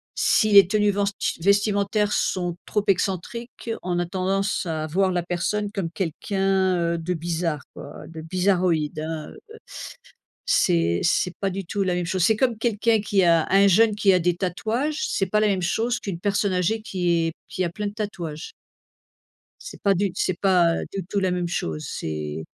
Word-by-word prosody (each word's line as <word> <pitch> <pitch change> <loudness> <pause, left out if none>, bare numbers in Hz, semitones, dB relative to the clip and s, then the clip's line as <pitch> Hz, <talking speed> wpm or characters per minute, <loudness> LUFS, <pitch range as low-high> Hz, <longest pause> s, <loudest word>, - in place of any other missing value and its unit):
si 215 -1 +3
les 200 -2 +8
tenues 210 +1 +2
venst 200 0 -1 0.3
vestimentaires 205 +2 +2
sont 175 -2 -1
trop 210 - -1
excentriques, 200 +6 -2
on 180 -1 -2
a 175 - 0
tendance 190 +2 -1
à 160 -2 -2
voir 190 +4 +1
la 175 -1 -1
personne 200 +4 -2
comme 195 -5 -3
quelqu'un, 190 +3 0 0.2
heu, - - -2
de 165 +2 -2
bizarre, 165 -2 -2
quoi, - - -10
de 160 -1 -9
bizarroïde, 175 -3 0
hein, 155 -1 -5
heu, - - -13 1.1
c'est 85 0 +2
c'est 180 +1 +1
pas 195 - +1
du 195 0 -5
tout 200 +3 -3
la 180 -2 0
même 175 -1 -1
chose. 185 +1 0
C'est 220 +4 +4
comme 245 -3 +1
quelqu'un 225 0 +1
qui 200 -2 +2
a 165 -2 +4
un 195 +1 +6
jeune 215 +3 +4
qui 205 -2 +4
a 185 - +4
des 175 0 +1
tatouages, 225 - -2
c'est 195 - 0
pas 210 +3 +1
la 215 - +3
même 195 -3 0
chose 230 +7 0
qu'une 190 -5 -5
personne 200 0 0
âgée 185 +5 0
qui 175 -5 0
est 165 - -4
qui 185 - -3
a 175 - 0
plein 210 +4 -4
de 200 - -5
tatouages. 175 -7 -5 1.1
C'est - - -10
pas 200 -1 +3
du 195 +2 0
c'est 185 -1 -1
pas 180 -4 +4 0.2
du 195 -2 -4
tout 200 +3 -2
la 190 -1 +1
même 180 -1 -1
chose, 80 - -3
c'est 75 0 -5
185 Hz, 185 wpm, -24 LUFS, 170-205 Hz, 1.1 s, les